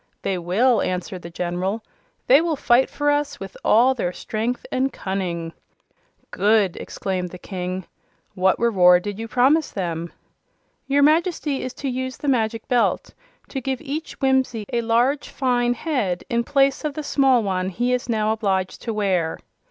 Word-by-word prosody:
"They 190 -2 -1
will," 220 +9 +2
answered 180 0 -3
the 170 - -8
General. 180 +5 -3 0.4
"They 275 +4 +6
will 335 -2 0
fight 255 -1 +3
for 290 0 0
us 290 0 -1
with 195 -1 -8
all 245 +4 +5
their 180 -9 -2
strength 225 +6 -3
and 265 +1 0
cunning." 175 -4 -4 0.8
"Good!" 205 -3 +2
exclaimed 185 -2 -4
the 180 - -9
King. 185 -1 -5 0.5
"What 190 +1 +2
reward 180 -6 +5
did 205 0 -5
you 225 - -4
promise 270 +7 +3
them?" 170 -3 -4 0.8
"Your 280 +1 +3
Majesty 310 -2 +2
is 255 - -5
to 280 - -5
use 260 0 -3
the 290 - -6
Magic 225 -4 0
Belt 245 -2 +1 0.4
to 270 - -4
give 265 0 -2
each 310 +1 -5
Whimsie 265 -5 +1
a 235 - +2
large, 240 +5 +1
fine 245 -2 +1
head, 230 - -1
in 235 0 +1
place 275 +1 +2
of 300 -2 -3
the 305 - -4
small 270 -4 +3
one 185 -2 -1
he 240 +6 0
is 250 -1 -2
now 215 -1 +1
obliged 195 -4 -1
to 225 -2 -4
wear." 185 -6 0
230 Hz, 165 wpm, -22 LUFS, 190-265 Hz, 0.8 s, They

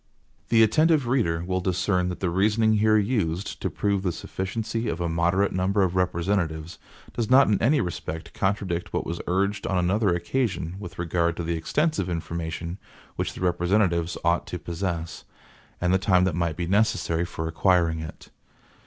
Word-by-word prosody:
(E1) - - -36
The 115 -1 +6
attentive 155 +5 +3
reader 85 -10 +1
will 95 0 -1
discern 90 0 0
that 90 - -6
the 90 -3 0
reasoning 110 +4 +3
here 110 +1 +4
used, 100 -4 -1
to - - -1
prove 100 -2 0
the 95 -2 0
sufficiency 110 +7 -4
of 85 - -3
a 85 - -1
moderate 85 +4 +1
number 95 +2 +1
of 90 -1 0
representatives, 85 -2 -1 0.3
does 115 -3 -2
not 135 +1 +7
in 105 -2 +1
any 140 +4 +3
respect 80 -2 -5
contradict 95 -3 -2
what - - -1
was 85 +1 -4
urged 100 +3 0
on 95 - 0
another 95 +4 +2
occasion 90 -2 -2
with 95 -4 -9
regard 85 0 0
to 85 - -3
the 85 +1 -1
extensive 145 - 0
information 85 +1 -4 0.4
which - - -2
the - - -8
representatives 90 -1 +1
ought 85 +1 +2
to 90 - -4
possess, 85 -2 -4 0.6
and 90 +1 +1
the 95 - +4
time 90 -2 +3
that 95 -2 +1
might 85 -1 -1
be 85 - -2
necessary 90 -3 +1
for 80 -2 -4
acquiring 85 -1 +2
it. 80 0 -9
90 Hz, 175 wpm, -25 LUFS, 85-105 Hz, 0.6 s, not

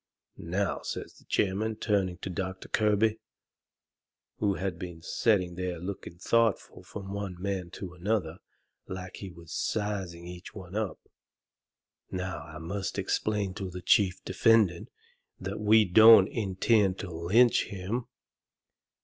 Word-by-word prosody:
"Now," 95 +3 -1
says - - -6
the - - -23
chairman, 105 +3 0
turning 100 -5 0
toward 90 +1 -6
Doctor 95 +1 -4
Kirby, 110 +1 +2 1.2
who 100 -2 +1
had 95 -2 -3
been 85 -2 -7
setting 95 -5 +1
there 90 0 -3
looking 90 0 -7
thoughtful 115 +3 +1
from 100 -1 -8
one 100 -3 -5
man 95 -2 -3
to 90 -3 -7
another, 90 -2 -1 0.5
like 95 0 -7
he 100 - -7
was 85 -2 -13
sizing 95 -5 -2
each 90 +1 -9
one 95 -1 -9
up, 110 -3 -3 1.0
"now 95 -3 -4
I 80 0 -10
must 95 +4 -4
explain 105 -3 -1
to 95 -2 -5
the 90 0 -8
chief 95 -1 +3
defendant 110 -7 +3 0.5
that 95 +2 -5
we 110 +1 +5
don't 110 +1 +8
intend 100 -1 +2
to 95 - -6
lynch 100 +9 +4
him." 100 +6 -4
95 Hz, 130 wpm, -29 LUFS, 90-105 Hz, 1.2 s, don't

